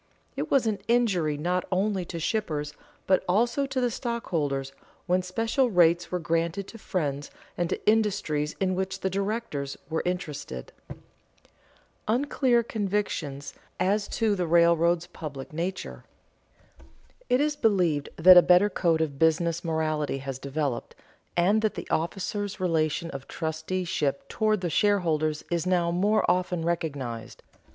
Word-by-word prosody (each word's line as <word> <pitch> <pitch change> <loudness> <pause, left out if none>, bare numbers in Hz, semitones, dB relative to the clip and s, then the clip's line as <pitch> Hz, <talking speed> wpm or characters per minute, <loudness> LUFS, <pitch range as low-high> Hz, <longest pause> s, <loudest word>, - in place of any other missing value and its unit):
It - - -3
was 270 -4 +3
an 215 -2 0
injury 195 -11 +2
not 180 +4 0
only 190 0 0
to 170 0 -6
shippers, 155 -6 -2 0.3
but 185 -1 +3
also 235 +8 +2
to 270 -1 -2
the 245 -1 +1
stockholders, 155 - -2 0.3
when 180 0 +2
special 225 +8 0
rates 175 -3 +3
were 180 - 0
granted 170 +3 -1
to 225 - -11
friends 145 -8 -2 0.3
and 175 -1 -1
to - - -4
industries 205 -9 +1
in 185 -1 +1
which 190 +1 -3
the 190 - -1
directors 195 -8 -3
were 160 - 0
interested. 150 - -4
[Sidenote: - - -11 1.0
Unclear 245 0 +2
convictions 195 -10 -3 0.3
as 205 +2 +1
to 220 -2 +1
the 180 -3 -1
railroads' 170 0 +4
public 150 -6 -8
nature] 175 +4 -4 1.3
It 250 - +4
is 300 +1 +1
believed 180 - +1
that 180 +2 +9
a - - +11
better 180 +4 +5
code 165 -3 +1
of 140 -4 -2
business 165 +1 +2
morality 155 -3 -1
has 135 -1 -6
developed, 140 -2 -3 0.4
and 200 +5 +3
that 215 -1 0
the - - -6
officers' 195 +4 -2
relation 165 -2 0
of 135 -1 -8
trusteeship 160 -2 -2
toward 215 -3 +1
the 175 - -1
shareholders 160 -6 +1
is 170 0 0
now 175 -2 +2
more 205 +5 +2
often 180 -1 0
recognized. 140 -9 -3
175 Hz, 140 wpm, -27 LUFS, 155-205 Hz, 1.3 s, a